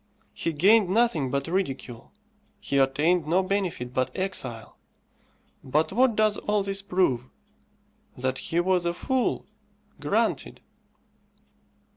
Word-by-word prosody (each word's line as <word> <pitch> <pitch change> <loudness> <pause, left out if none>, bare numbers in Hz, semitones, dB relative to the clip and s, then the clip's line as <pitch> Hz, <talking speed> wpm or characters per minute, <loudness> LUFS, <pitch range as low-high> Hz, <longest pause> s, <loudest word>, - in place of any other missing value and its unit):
He 165 - -2
gained 195 +6 +4
nothing 190 - +2
but 140 +3 -2
ridicule, 135 -9 -3 0.5
he 140 - 0
attained 150 +5 +2
no 180 +4 +2
benefit 185 -11 -2
but 130 0 0
exile. 185 -12 -4 0.8
But 150 +4 0
what 245 0 +3
does 215 -1 +2
all 210 -1 0
this 195 0 -1
prove? 180 -11 0 0.9
that 130 +1 -2
he 170 - -1
was 180 -1 +1
a 170 - -1
fool. 260 +6 -1 0.5
Granted. - - -1
175 Hz, 115 wpm, -26 LUFS, 135-195 Hz, 0.9 s, gained